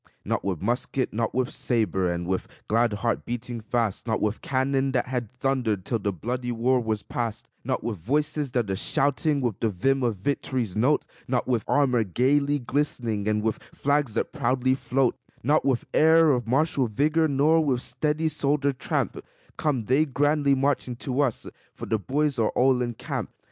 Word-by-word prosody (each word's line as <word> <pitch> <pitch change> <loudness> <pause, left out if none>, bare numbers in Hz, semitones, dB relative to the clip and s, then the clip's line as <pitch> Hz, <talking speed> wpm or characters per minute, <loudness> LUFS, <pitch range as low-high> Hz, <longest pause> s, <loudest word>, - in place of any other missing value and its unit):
Not - - -1
with 95 -4 -2
musket, 125 +3 -1
and 115 +1 +1
with 130 0 -1
saber, 95 -7 0
and 85 0 -3
with 95 +1 -2 0.2
glad 115 +1 +2
heart 110 +3 -1
beating 120 0 -5
fast; 115 -1 -1
Not 110 - 0
with 105 0 -1
cannon 135 0 0
that 125 - +1
had 125 -4 -3
thundered 125 -6 -1
till 115 - -1
the 100 0 -1
bloody 125 +7 -3
war 125 +2 +2
was 110 -2 -2
past; 115 -3 -4 0.2
Not - - -2
with 110 -4 -3
voices 145 - -1
that 115 -6 0
are - - 0
shouting 140 - +1
with 120 -7 -2
the 115 - +1
vim 135 +8 +1
of 120 -3 +1
victory's 125 -2 -2
note; 130 +8 +2 0.2
Not 125 -2 0
with 120 -4 +1
armor 130 -5 +3
gayly 140 +8 +2
glistening, 120 -6 -2
and 105 0 +1
with 110 -1 -1 0.2
flags 140 -5 0
that - - -1
proudly 130 -3 +1
float; 130 0 +1 0.3
Not 150 +5 +2
with 130 -3 +1
air 160 0 +6
of 120 -4 0
martial 135 0 +2
vigor, 150 +8 +2
nor 155 +3 +3
with 130 -4 0
steady, 150 +5 0
soldier 145 -2 +1
tramp, 130 - -2 0.3
Come 135 -8 -1
they 140 +7 +3
grandly 145 0 +2
marching 135 -2 0
to 130 +3 -2
us 130 -6 -1 0.3
for - - -7
the 110 - 0
boys 140 - 0
are 110 - +3
all 130 0 +3
in 120 -1 -2
camp. - - -4
125 Hz, 180 wpm, -26 LUFS, 115-140 Hz, 0.3 s, air